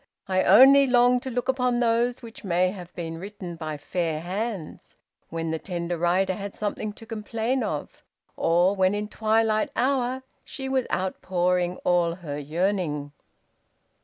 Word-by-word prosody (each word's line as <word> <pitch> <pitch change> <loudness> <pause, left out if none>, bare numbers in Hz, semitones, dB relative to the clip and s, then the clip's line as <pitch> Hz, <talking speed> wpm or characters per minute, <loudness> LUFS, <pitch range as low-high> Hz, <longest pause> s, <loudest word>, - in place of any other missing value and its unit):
I 185 -1 +2
only 270 +8 +7
long 245 0 +4
to 260 - -6
look 245 0 -2
upon 250 -2 +1
those 240 +1 +1
which 230 0 -11
may 180 -1 +2
have 180 -3 -9
been 165 -1 -5
written 195 -3 -7
by 155 -2 -5
fair 160 +1 -2
hands, 190 -1 -5 0.3
when 165 -1 -3
the 160 - -2
tender 175 -1 -3
writer 180 +3 +1
had 200 +1 -6
something 210 0 -3
to 225 - -13
complain 225 +3 -2
of, 155 -9 -5 0.3
or 175 +4 +3
when 190 +1 +2
in 210 0 -3
twilight 220 0 +1
hour 260 0 0 0.2
she 265 -1 -6
was 265 -1 0
outpouring 180 -1 0
all 175 -1 +2
her 150 -5 -6
yearning!" 155 -2 -1
195 Hz, 150 wpm, -25 LUFS, 175-230 Hz, 0.3 s, only